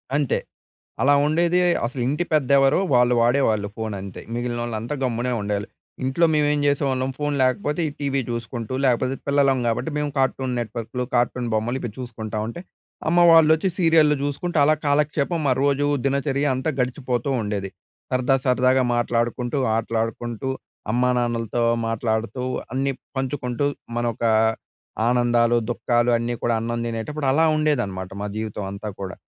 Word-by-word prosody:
అంతే. 145 -4 +1 0.6
అలా 145 +1 +5
ఉండేది 170 +3 +2 0.3
అసలు 130 +1 -5
ఇంటి 150 +5 0
పెద్ద 150 -5 +2
ఎవరో 135 +4 +4 0.2
వాళ్ళు 125 0 +4
వాడేవాళ్ళు 115 -5 +2
ఫోనంతే. 100 -4 -5
మిగిలినోళ్ళంతా 120 +1 -3
గమ్మునే 125 0 -1
ఉండేవాళ్ళు. 105 +1 -2 0.4
ఇంట్లో 135 +6 +2
మేమేం 150 -1 +2
చేసేవాళ్ళం 135 -2 +1
ఫోన్ 145 -1 -1
లేకపోతే 150 +5 0
ఈ - - -5
టీవీ 140 -1 0
చూసుకుంటూ 115 +1 -4
లేకపోతే 130 +1 +2
పిల్లలం 140 -2 +3
కాబట్టి 115 +8 -1
మేము 150 -1 -1
కార్టూన్ 130 -1 0
నెట్‍వర్క్‌లు, 120 +2 -4
కార్టూన్ 120 0 +1
బొమ్మలు 120 +4 0
ఇపి 120 - -4
చూసుకుంటా 110 -3 -5
ఉంటే, 120 +9 -6 0.5
అమ్మ 175 +2 +3
వాళ్ళు 160 -1 +7
వచ్చి 175 +4 0
సీరియల్లు 160 -4 +4
చూసుకుంటే 155 +4 -2
అలా 155 +1 +4
కాలక్షేపం 150 +3 +1
మా 130 - +4
రోజు 145 0 +2 0.2
దినచర్య 140 +1 0
అంతా 130 +5 -1
గడిచిపోతూ 125 0 -1
ఉండేది. 100 -2 -3 0.4
సరదా, 130 +1 +2
సరదాగా 130 0 +3
మాట్లాడుకుంటూ, 120 +2 -1 0.2
ఆటలాడుకుంటూ 115 +2 -2 0.4
అమ్మానాన్నలతో 120 -1 0 0.3
మాట్లాడుతూ 115 +2 -2 0.3
అన్ని 135 +1 0 0.2
పంచుకుంటూ, 130 0 -2 0.3
మనోక 120 -1 -2 0.9
ఆనందాలు, 120 -1 +3
దుఃఖాలు 120 0 +1
అన్నీ 120 +1 -2
కూడా 120 -1 +1
అన్నం 120 +1 -2
తినేటప్పుడు 135 +6 -3
అలా 160 +3 +4
ఉండేదన్నమాట 120 -12 -1
మా - - -2
జీవితం 110 -2 -4
అంతా 105 +2 -6
కూడా. 95 -1 -5
125 Hz, 135 wpm, -23 LUFS, 115-140 Hz, 0.9 s, వాళ్ళు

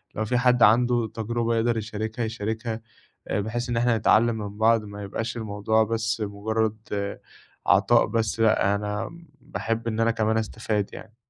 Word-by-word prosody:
لو 110 - -1
في 125 +3 +1
حَد 125 -1 +4
عنده 120 +1 +4
تجربة 115 +1 -1
يقدر 115 +1 +1
يشاركها، 110 +2 -3
يشاركها 110 +1 -3 0.5
آآ، - - 0
بحيث 120 +4 -3
إن 120 - 0
إحنا 120 -1 +3
نتعلّم 110 +2 +4
من 105 -1 -6
بعض 110 0 +4
ما 105 0 -8
يبقاش 110 +4 -4
الموضوع 110 0 +1
بَس 115 +1 -1
مُجرّد 110 +2 -1 0.9
عطاء - - +4
بَس 115 -1 -1
لأ، 110 -2 +3
أنا 105 0 -3
م 170 0 -15
باحب 115 -1 -3
إن 110 -1 -2
أنا 115 0 +3
كمان 110 -1 +1
أستفاد 110 -2 -2
يعني. 110 0 -11
110 Hz, 165 wpm, -25 LUFS, 110-115 Hz, 0.9 s, حَد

